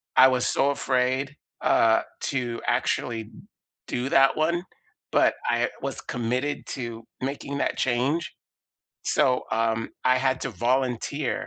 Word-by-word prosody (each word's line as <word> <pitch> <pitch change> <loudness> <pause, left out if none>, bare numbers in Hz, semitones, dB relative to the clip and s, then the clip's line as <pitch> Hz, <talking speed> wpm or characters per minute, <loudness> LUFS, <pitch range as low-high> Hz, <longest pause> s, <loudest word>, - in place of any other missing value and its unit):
I 130 - +9
was 125 -1 +1
so 140 - +2
afraid, 130 +1 0 0.3
uh, 110 0 +4 0.3
to 120 -4 -2
actually 115 -2 0
d - - -17 0.6
do 125 +2 -2
that 135 0 +5
one, 170 +3 +1 0.5
but - - +4
I - - +2
was - - -4
committed 125 +5 -2
to 115 -3 -5 0.2
making 140 +1 -3
that - - 0
change, 130 +7 0 0.7
so, 130 -4 +2
um, 115 0 0
I 130 0 +5
had 130 0 +1
to 135 - -2
volunteer 125 +5 -1
130 Hz, 130 wpm, -26 LUFS, 120-135 Hz, 0.7 s, I